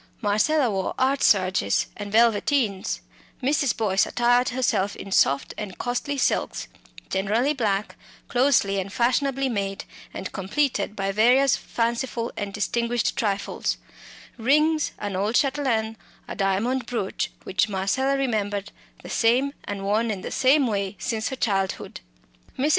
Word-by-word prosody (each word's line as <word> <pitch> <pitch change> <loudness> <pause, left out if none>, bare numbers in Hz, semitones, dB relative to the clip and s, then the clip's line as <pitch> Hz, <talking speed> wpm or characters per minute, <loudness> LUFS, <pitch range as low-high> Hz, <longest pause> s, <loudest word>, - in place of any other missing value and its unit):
Marcella 230 +6 +2
wore 190 -1 -2
"art 270 +1 +1
serges" 185 - +3
and 205 -1 -6
velveteens; 225 -1 +2 0.4
Mrs. 280 -1 +1
Boyce 200 -3 +2
attired 245 +1 +2
herself 245 -6 0
in 195 - -9
soft 140 -6 +2
and 200 -3 -6
costly 250 +4 -2
silks, 260 - 0 0.4
generally 215 +9 +1
black, 210 -6 -1 0.3
closely 245 -6 +2
and 190 +1 -4
fashionably 270 +3 +1
made, 200 -5 -3 0.3
and 190 - -6
completed 210 +1 -1
by 195 -1 -1
various 245 +6 +4
fanciful 235 0 -2
and 205 -1 -4
distinguished 235 +3 -1
trifles 200 -3 -1 0.6
rings, 300 +5 +2
an 205 -2 -4
old 205 +5 0
chatelaine, 255 -6 +1 0.3
a - - -6
diamond 225 +6 0
brooch 215 -6 -2
which 205 +3 0
Marcella 210 +8 0
remembered, 205 -6 -1 0.3
the - - -9
same, 250 +5 +2
and 200 -1 -5
worn 215 +4 +1
in 200 -3 -3
the - - -6
same 270 +2 +4
way, 200 -3 -2
since 220 +1 -2
her 265 - -4
childhood. 195 - -2 0.6
Mrs. 280 +4 +1
225 Hz, 135 wpm, -24 LUFS, 200-260 Hz, 0.6 s, various